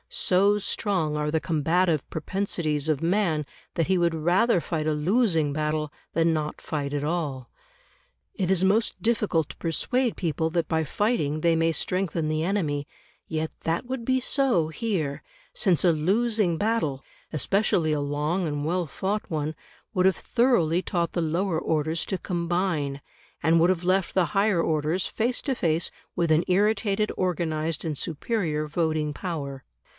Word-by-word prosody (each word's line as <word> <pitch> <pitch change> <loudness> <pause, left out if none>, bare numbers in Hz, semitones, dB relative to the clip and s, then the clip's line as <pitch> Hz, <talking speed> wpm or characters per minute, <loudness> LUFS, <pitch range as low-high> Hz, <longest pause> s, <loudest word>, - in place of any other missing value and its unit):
So 200 +3 +3
strong 190 -6 0
are 150 0 -1
the 160 - +2
combative 165 0 +1
propensities 160 -4 -1
of 155 0 0
man 170 -4 +1 0.3
that 165 - +1
he 190 -1 +2
would 170 -1 +2
rather 180 +7 +3
fight 160 -2 -2
a 155 - +2
losing 165 - +2
battle 150 0 -1 0.2
than 165 0 +3
not 150 -1 -3
fight 145 -3 -3
at 145 0 -2
all. 150 -6 -2 0.8
It 185 -2 -2
is 190 -1 +3
most 205 +4 +2
difficult 210 -9 +1
to - - -10
persuade 240 - 0
people 160 -2 -1
that 165 0 -1
by 160 -1 +1
fighting 155 - 0
they 170 0 +3
may 165 0 +2
strengthen 170 -2 -1
the 155 0 0
enemy, 155 -7 -1 0.4
yet 160 0 -2
that 165 +7 -1
would 255 -1 -4
be 260 +2 +2
so 250 - +2
here; 160 -7 -2 0.3
since 185 -5 +2
a 175 - +6
losing 195 +2 +1
battle 205 -11 0 0.3
especially 165 0 +1
a 150 - 0
long 150 +5 -1
and 145 -1 -2
well 175 +1 0
fought 200 +7 -3
one 155 -1 -2 0.4
would 185 -2 +3
have 190 - +2
thoroughly 185 -9 +2
taught 170 -3 -1
the 175 - 0
lower 165 +1 0
orders 160 +1 0
to 190 - -2
combine, 170 -5 -1 0.4
and 165 +2 +4
would 170 +2 +4
have 180 -2 0
left 185 0 +1
the 185 -2 +3
higher 195 -3 +3
orders 160 +3 0
face 240 +3 -1
to 275 - 0
face 165 -7 0 0.3
with 170 -2 +1
an 155 +2 +4
irritated, 210 +2 +2
organised, 165 -3 -1
and 155 -3 -2
superior 160 - -1
voting 155 -1 0
power. 145 -7 -5
165 Hz, 160 wpm, -26 LUFS, 155-190 Hz, 0.8 s, a